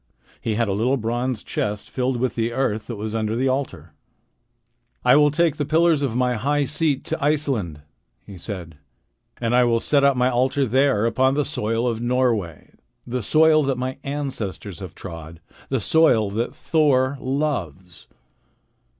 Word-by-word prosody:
He 110 - -2
had 115 0 +1
a 100 - 0
little 120 +7 +1
bronze 120 0 -2
chest 105 0 -3
filled 130 -1 -1
with 125 0 -1
the 115 0 -2
earth 110 -4 -1
that 120 - -5
was 110 +1 -5
under 110 0 -1
the 130 +3 0
altar. 95 - -3 1.1
"I 125 - +6
will 150 0 +5
take 160 0 +1
the 145 - -1
pillars 160 +1 +2
of 130 -5 -1
my 125 0 +1
high 145 +6 +1
seat 150 0 0
to - - -4
Iceland," 135 - 0 0.4
he 100 - -11
said, 90 -5 -8 0.6
"and 115 0 -1
I 125 - +5
will 115 -1 +2
set 140 +3 +1
up 140 -2 +4
my 125 0 +3
altar 130 +3 +1
there 130 -2 +2
upon 130 +3 +2
the 145 -1 +1
soil 115 -3 -1
of 115 -1 -2
Norway, 120 -9 -1 0.3
the 125 +1 -3
soil 155 +7 +4
that 135 - +1
all - - -8
my 130 +1 -4
ancestors 130 - -4
have 95 -4 -9
trod, 80 -3 -9 0.3
the 135 - 0
soil 115 -5 +3
that 115 +4 -3
Thor 140 -3 +1
loves." 105 - -3
125 Hz, 170 wpm, -22 LUFS, 110-140 Hz, 1.1 s, I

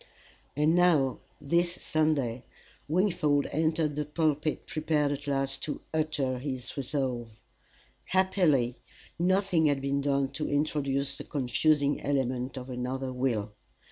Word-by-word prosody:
And 150 +3 +3
now 165 -8 +3 0.2
this 170 +4 +1
Sunday, 145 -9 0 0.4
Wingfold 155 -4 +2
entered 155 0 +1
the 150 +1 -1
pulpit 150 0 -1
prepared 155 -2 0
at 145 0 -5
last 135 -1 0
to 150 - -4
utter 150 -5 0
his 130 -3 -5
resolve. 125 -5 -3 0.6
Happily 165 -10 +2 0.4
nothing 185 -2 +3
had 145 -2 +2
been 140 +1 0
done 140 -1 +1
to 150 +2 -3
introduce 140 -1 0
the - - -5
confusing 145 +1 +1
element 130 -2 -1
of 125 0 -6
another 130 +1 -3
will. 115 -5 -1
145 Hz, 120 wpm, -29 LUFS, 130-155 Hz, 0.6 s, And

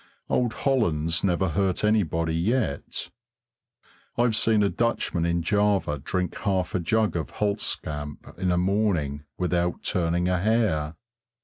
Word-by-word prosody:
Old 120 -3 +1
Hollands 85 - +1
never 95 -1 +1
hurt 95 +3 0
anybody 85 -7 +1
yet. 90 - -1 1.1
I've 120 -2 +3
seen 110 -1 +3
a 100 - +3
Dutchman 95 -8 0
in 85 0 0
Java 100 -6 +1
drink 90 +5 -2
half 95 -3 0
a 95 - +1
jug 110 +5 +1
of 80 -4 -3
Hulstkamp 75 -8 -2
in 90 -1 +1
a 90 - +2
morning 90 -7 0
without 90 -1 0
turning 85 0 +1
a 90 0 +1
hair. 95 -8 +1
90 Hz, 130 wpm, -26 LUFS, 85-105 Hz, 1.1 s, I've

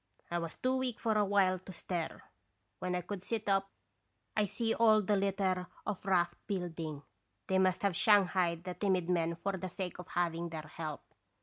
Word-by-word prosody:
" - - -33
I 175 - +1
was 165 -1 -5
too 260 +1 +1
weak 255 -3 -1
for 225 - +1
a 210 - +4
while 195 -2 +3
to 185 - -10
stir. 175 -2 -4 0.6
When 180 0 -1
I 180 - 0
could 185 +2 -5
sit 220 +2 -3
up 195 0 +2 0.7
I 210 - +3
see 225 +3 0
all 220 -2 +5
the 205 +1 +2
litter 195 -2 +1 0.2
of 200 -2 -4
raft 175 -2 +2
building. 165 -6 -3 0.4
They 190 0 +2
must 185 0 +2
have 200 -3 +2
shanghaied 180 -4 +4
the 180 0 -4
timid 185 -3 +1
men 170 -1 +1
for 195 +3 -2
the 185 0 -4
sake 180 0 -5
of 180 - -7
having 170 -1 -1
their 160 -1 -5
help. 155 -3 -4
185 Hz, 195 wpm, -33 LUFS, 175-200 Hz, 0.7 s, all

